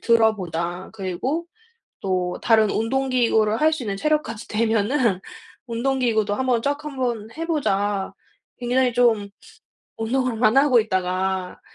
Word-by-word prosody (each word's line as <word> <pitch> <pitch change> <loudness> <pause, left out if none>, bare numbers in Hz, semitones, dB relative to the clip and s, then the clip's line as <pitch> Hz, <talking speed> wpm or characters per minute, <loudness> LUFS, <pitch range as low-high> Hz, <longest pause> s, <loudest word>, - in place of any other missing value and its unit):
들어보자. 185 -6 +1
그리고 225 - -3 0.6
또 185 -2 -1
다른 220 -3 +4
운동기구를 230 -2 +1
할 315 +1 +5
수 305 -5 -3
있는 200 -2 -3
체력까지 295 -3 -1
되면은 220 -1 +1 0.5
운동기구도 235 -3 0
1 260 - -2
번 240 -2 +2
쫙 285 +3 -2
1 290 -3 -7
번 235 -4 -2
해 330 - -3
보자.' 205 - 0 0.5
굉장히 250 +1 +2
좀 230 -4 +2 0.7
운동을 240 0 -1
안 225 +2 +4
하고 270 -4 +5
있다가 185 -2 -2
225 Hz, 255 characters per minute, -23 LUFS, 200-260 Hz, 0.7 s, 할